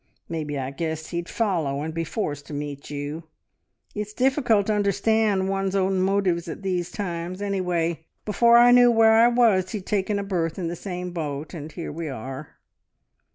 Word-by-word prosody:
Maybe 155 -3 -3
I 135 0 -3
guessed 160 +2 -4
he'd 170 0 -3
follow 160 -11 -1
and 160 +1 -4
be 165 +1 -2
forced 145 -6 -4
to 150 - -6
meet 145 -1 -6
you. 145 +3 -5 0.7
It's 210 0 -5
difficult 250 -5 +2
to 215 - +1
understand 205 -1 +2
one's 195 0 -1
own 190 -1 +1
motives 185 -3 +1
at 170 - -7
these 180 -2 -1
times. 175 -2 -4
Anyway, 175 -5 -1 0.2
before 235 +3 +5
I 240 +1 +7
knew 245 0 +7
where 225 -1 +5
I 225 +1 +6
was 230 -6 +3
he'd 200 -4 -4
taken 205 0 0
a 200 - -2
berth 170 -5 -2
in 175 -3 -2
the 170 - -4
same 180 0 -5
boat, 150 -2 -4
and 155 -2 -7
here 170 - -6
we 160 0 -5
are! 135 +3 -7
180 Hz, 180 wpm, -24 LUFS, 160-205 Hz, 0.7 s, I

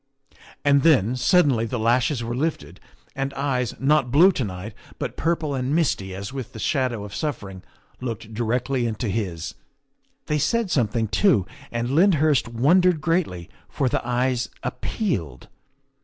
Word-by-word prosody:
And 140 -1 +5
then, 130 -8 +4
suddenly, 130 -3 +3
the 125 - -3
lashes 120 +3 +1
were 115 +1 -3
lifted 155 +5 -3 0.4
and 135 0 -2
eyes, 130 -4 -1
not 135 0 +2
blue 165 +9 +6
to 135 - -2
night, 100 +1 -6 0.2
but - - -4
purple 165 -3 -1
and 130 +2 -1
misty 100 - 0
as 100 +6 -6
with 130 -2 -6
the - - -9
shadow 130 -6 0
of 105 -1 -9
suffering, 100 - -4 0.4
looked 115 -3 -6
directly 120 +3 0
into 110 0 -3
his. 95 -6 -3 0.7
They 150 0 0
said 230 - 0
something 115 -4 +1
too, 120 - +3 0.3
and 120 +1 -2
Lyndhurst 155 -5 +3
wondered 160 +9 +3
greatly, 155 - -1 0.2
for 135 - 0
the - - 0
eyes 125 0 0
appealed. 95 - -3
125 Hz, 145 wpm, -23 LUFS, 110-150 Hz, 0.7 s, blue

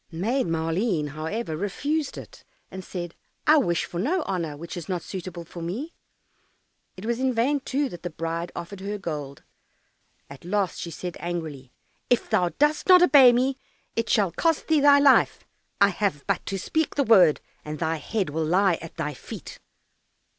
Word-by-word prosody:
Maid 220 +10 -1
Maleen, 165 0 0
however, 160 +5 -4
refused 280 - -2
it, - - -11 0.3
and 190 0 -7
said, 175 -2 -6 0.3
"I 310 +1 +6
wish 175 - +1
for 175 - -6
no 315 - 0
honour 165 -6 -3
which 170 +3 -7
is 175 -1 -7
not 180 -3 -2
suitable 180 -2 -7
for 170 +1 -9
me." 225 - -4 1.0
It 190 - -8
was 235 +1 -1
in 260 -1 0
vain, 270 +6 +2
too, 275 +1 -1
that 175 - -9
the 175 - -4
bride 165 +1 -4
offered 185 +3 -7
her 205 +2 -4
gold. 150 -7 -6 0.8
At 140 -1 -12
last 190 +1 -1
she 170 - -5
said 175 +2 -6
angrily, 155 -7 -5 0.4
"If 245 - +1
thou 180 -5 +3
dost 295 - +1
not 365 -1 +9
obey 270 -6 +8
me, 260 +2 +1 0.4
it 230 0 -1
shall 200 -5 +3
cost 325 - 0
thee 315 -1 +4
thy 285 0 +7
life. 280 -2 +4 0.3
I 200 - +6
have 190 -7 -2
but - - -1
to 195 - -2
speak 315 - -1
the 285 - +2
word, 190 - +6 0.2
and 150 0 -5
thy 160 +1 -1
head 185 +2 -2
will 160 +2 -1
lie 180 +1 +2
at 165 - -10
thy 150 - -2
feet." - - -10
185 Hz, 180 wpm, -25 LUFS, 165-250 Hz, 1.0 s, not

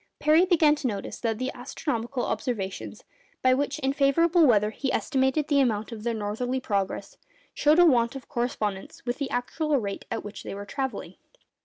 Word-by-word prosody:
Parry 315 +4 +4
began 325 -5 +4
to 290 - -2
notice 205 -4 -4
that 225 -2 -1
the 255 +3 -2
astronomical 245 -1 -3
observations, 210 -4 -4 0.4
by 255 0 +5
which 285 +2 -1
in 270 -2 0
favourable 320 +4 +4
weather 210 -3 +3
he 265 +4 -2
estimated 270 +1 +1
the 285 -2 +3
amount 220 -4 +1
of 225 -2 -7
their 235 +2 -1
northerly 225 +5 -2
progress, 200 -6 -2 0.4
showed 300 +2 +3
a 350 - +7
want 240 -4 +3
of 270 - -8
correspondence 230 -8 -3
with 245 +2 -2
the 280 -2 -2
actual 295 +4 0
rate 200 -3 -5
at - - -3
which 205 0 -8
they - - -6
were 200 0 -7
travelling. 265 +4 -4
255 Hz, 180 wpm, -26 LUFS, 220-285 Hz, 0.4 s, a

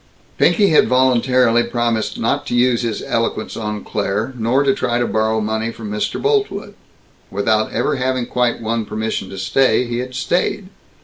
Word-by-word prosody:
Pinky 205 -3 +4
had 155 - +4
voluntarily 125 -1 +3
promised 120 -2 -1
not 115 - -1
to - - -1
use 120 -1 +3
his 115 -3 -3
eloquence 115 -1 -2
on 105 -2 -4
Claire, 105 +5 -2
nor 120 +4 +1
to 135 -1 +3
try 120 -2 -1
to 120 - +1
borrow 110 0 0
money 110 +1 -2
from 110 -2 -8
Mr. 105 0 -2
Boltwood. 425 -1 -1 0.6
Without 110 +2 0
ever 150 - 0
having 130 -1 -1
quite 120 -1 0
won 115 +1 -1
permission 110 -2 -3
to 95 - -8
stay, 125 +5 +2
he 120 0 -3
had 125 0 -5
stayed. 180 +7 -1
120 Hz, 170 wpm, -19 LUFS, 110-130 Hz, 0.6 s, Pinky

